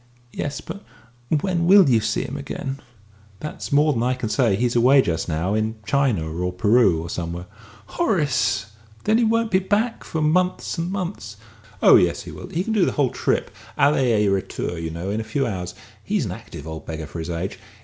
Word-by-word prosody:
"Yes; 145 0 -4
but 200 - -8 0.5
when 170 +2 +1
will 195 -2 +7
you 120 -4 +4
see 110 0 -1
him 135 - -6
again?" 140 -1 -5 0.6
"That's 150 - -6
more 150 +1 +4
than 115 - -1
I 125 +2 +1
can 125 -4 -4
say. 115 -5 +2
He's 120 +3 0
away 130 +3 +6
just 85 0 -2
now 85 +5 -1
in 110 +1 0
China, 130 - +1
or 90 +3 -2
Peru, 105 -1 +3
or - - -6
somewhere." 85 0 -4 0.4
"Horace! 135 - +1 0.4
Then 220 +2 +3
he - - +3
won't 230 0 +1
be 185 - +4
back 215 +5 0
for 160 - -4
months 180 +3 +1
and 170 +2 -2
months!" 180 - -5 0.5
"Oh - - +9
yes, - - +1
he - - -9
will. - - -9
He 175 - -2
can 220 - -2
do 210 -4 +3
the - - -1
whole 140 -4 +1
trip, - - -1 0.3
aller 145 +1 +4
et 115 -5 +3
retour, 95 -3 -1
you 80 0 -3
know, 85 +4 -4
in 110 +2 -1
a - - -4
few 125 +5 -1
hours. 90 -5 -4 0.3
He's - - 0
an - - -4
active 75 - -9
old 80 -2 -7
beggar 80 -1 -5
for 75 +3 -8
his 80 +1 -5
age. 90 +3 -4
120 Hz, 205 wpm, -22 LUFS, -, 0.6 s, Oh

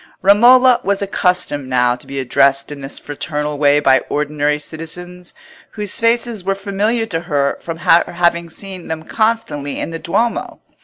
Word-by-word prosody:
Romola 245 +5 +6
was 200 0 0
accustomed 180 -8 -1
now 125 -1 +2
to 125 - -16
be 140 - -6
addressed 135 +2 +2
in 145 -1 -8
this 135 +1 -7
fraternal 150 0 -4
way 145 0 +4
by 135 -2 +4
ordinary 150 0 0
citizens, 175 +4 -8 0.4
whose 210 -3 -3
faces 230 -2 0
were 195 +1 0
familiar 205 +4 -1
to 175 -7 -3
her 145 -5 -1
from 165 -1 -6
her 170 0 +4
having 170 -1 +1
seen 185 +1 -7
them 160 0 -5
constantly 215 -12 -1
in - - -4
the 165 - -5
Duomo. 230 +9 -2
170 Hz, 160 wpm, -17 LUFS, 145-200 Hz, 0.4 s, Romola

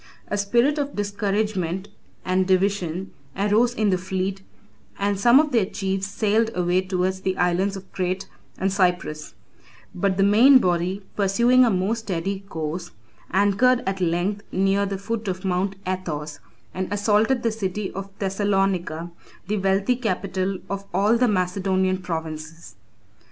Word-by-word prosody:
A - - -1
spirit 240 +9 +2
of 285 0 -3
discouragement 200 -3 -1 0.4
and 185 0 +1
division 190 -1 0 0.3
arose 215 +5 +2
in 215 -4 +2
the 185 - +1
fleet, 190 +1 -3 0.6
and 200 0 0
some 240 +5 +6
of 305 -1 +1
their 225 -6 +2
chiefs 195 -1 -2
sailed 215 +2 +1
away 180 +1 +2
towards 185 0 -1
the 190 0 -1
islands 180 +3 +1
of 190 0 -12
Crete 185 0 -2 0.3
and 190 0 0
Cyprus; 180 -5 0 0.6
but 190 +1 0
the 195 - +3
main 230 +7 +7
body, 185 -1 0
pursuing 235 +6 +4
a 240 - +4
more 195 +2 +1
steady 195 -3 -3
course, 170 -3 -5 0.4
anchored 205 +6 +3
at 195 0 -2
length 180 +4 0
near 195 +1 +2
the 195 0 -3
foot 220 +2 -4
of 185 0 -3
Mount 190 +1 0
Athos, 155 -5 -4 0.3
and 185 +1 -4
assaulted 210 +4 +2
the 230 - +2
city 205 -2 -3
of 195 +1 -6
Thessalonica, 195 -4 -1 0.4
the 210 +1 0
wealthy 195 +5 +2
capital 195 -4 -2
of 200 0 -4
all 210 +4 +4
the 245 +1 +3
Macedonian 185 -1 +1
provinces. 160 -2 -6
195 Hz, 145 wpm, -23 LUFS, 185-205 Hz, 0.6 s, main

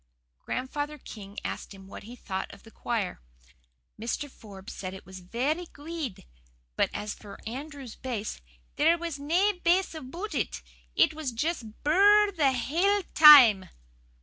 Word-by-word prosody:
Grandfather 290 +4 -4
King 205 -6 -11
asked - - -5
him 195 0 -14
what 195 - -10
he 235 +4 -11
thought 190 -5 -5
of - - -15
the 225 - -15
choir. 220 -7 -3 0.8
Mr. 260 +5 -3
Forbes 200 -5 -11
said 185 0 -6
it 190 - -12
was 190 +1 -10
'verra 265 - -2
guid,' 300 - -6 0.5
but - - +2
as 210 0 -4
for 205 -2 -12
Andrew's 270 0 -7
bass, 220 - -5 0.4
'there 330 +3 +4
was 335 -4 -5
nae 355 +7 +1
bass 360 +2 +2
aboot 330 +7 -7
it 65 - -3 0.3
it - - +4
was 305 -4 -4
just 300 +8 -2
a - - -12 0.2
bur 295 - +1
r 365 - +2
r 415 +1 +7
r - - -7
the 300 -8 +2
hale 350 +11 +1
time. 260 -11 +9
275 Hz, 165 wpm, -28 LUFS, 215-325 Hz, 0.8 s, time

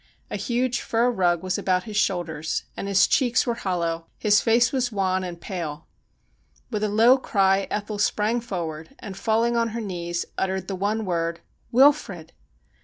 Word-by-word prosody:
A - - -2
huge 250 +1 -1
fur 235 +2 +1
rug 175 -5 +1
was 185 0 -1
about 185 -1 +1
his 215 -2 -8
shoulders, 165 -6 -1
and - - -5
his 195 -1 +4
cheeks 250 -3 +2
were 240 - 0
hollow, 170 -6 -2
his 210 -1 +3
face 235 +1 +3
was 250 -3 0
wan 190 -2 0
and 175 -2 -6
pale. 165 -5 -5 0.9
With 215 -2 -2
a 215 - +1
low 230 +5 +5
cry 195 -4 +2
Ethel 210 0 -3
sprang 215 +3 +1
forward, 170 - -5
and, 200 -4 -8
falling 230 +4 +1
on 230 0 +2
her - - -2
knees, 175 -5 -3
uttered 190 -1 -2
the 195 - -3
one 210 +3 -1
word: 170 -2 -2
' - - -40
Wilfrid 235 - +3
195 Hz, 175 wpm, -24 LUFS, 175-230 Hz, 0.9 s, low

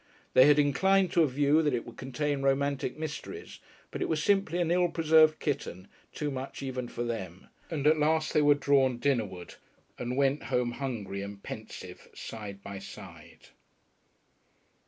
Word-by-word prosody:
They 130 - +7
had 150 0 +6
inclined 185 +6 +3
to 170 - +3
a 160 - +4
view 145 +3 +3
that 150 -5 +1
it 115 - -4
would - - -11
contain 140 +2 -2
romantic 135 -1 0
mysteries, 160 - -7 0.3
but - - -6
it - - -1
was 155 -2 0
simply 195 -4 +2
an 170 -1 +1
ill 175 0 +3
preserved 160 -1 +4
kitten 95 - -4 0.2
too 150 -1 -3
much 135 +1 -6
even 130 -2 -4
for 120 - -4
them. 95 -7 -6 0.2
And 150 -4 -3
at 155 +1 +5
last 155 +1 +1
they 150 - +4
were 145 0 +5
drawn 135 -3 +2
dinnerward 110 -9 -2 0.4
and 125 +1 -3
went 140 +1 +1
home 125 -2 0
hungry 115 -7 -4
and 100 0 -8
pensive - - -9
side 100 -3 -8
by 100 -1 -7
side. 100 - -12
140 Hz, 165 wpm, -29 LUFS, 120-155 Hz, 0.4 s, They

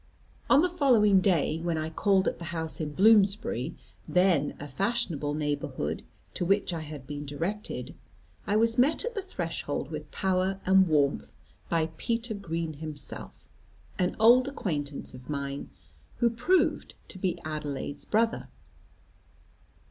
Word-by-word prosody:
"On 285 +3 +6
the - - +4
following 240 - +4
day, 165 -4 +2
when 170 -1 -1
I 155 0 -3
called 190 +3 +2
at - - -1
the 170 - -6
house 165 -2 -4
in 150 -1 -3
Bloomsbury 195 - +3 0.3
then 180 -6 +2
a 145 - -6
fashionable 165 - -1
neighbourhood 145 -1 -2 0.3
to - - -2
which 195 0 +1
I 165 - -2
had 150 -4 -8
been 145 +1 -5
directed, 170 +9 -4 0.5
I 205 - +1
was 230 +2 +3
met 300 - +3
at 485 - -3
the 410 - -2
threshold, 165 - -4
with 150 -1 -6
power 190 0 0
and 190 0 +5
warmth, 145 -3 +1 0.3
by 165 -1 +1
Peter 230 0 -2
Green 165 -5 -3
himself, 150 -1 -9 0.5
an 180 -1 +1
old 245 +4 +6
acquaintance 150 - -4
of 125 +1 -12
mine, 140 -1 -4 0.5
who 235 -1 +3
proved 250 +11 +1
to 190 - -10
be 180 -1 0
Adelaide's 150 -2 -4
brother. 225 +1 +1
175 Hz, 140 wpm, -28 LUFS, 150-215 Hz, 0.5 s, On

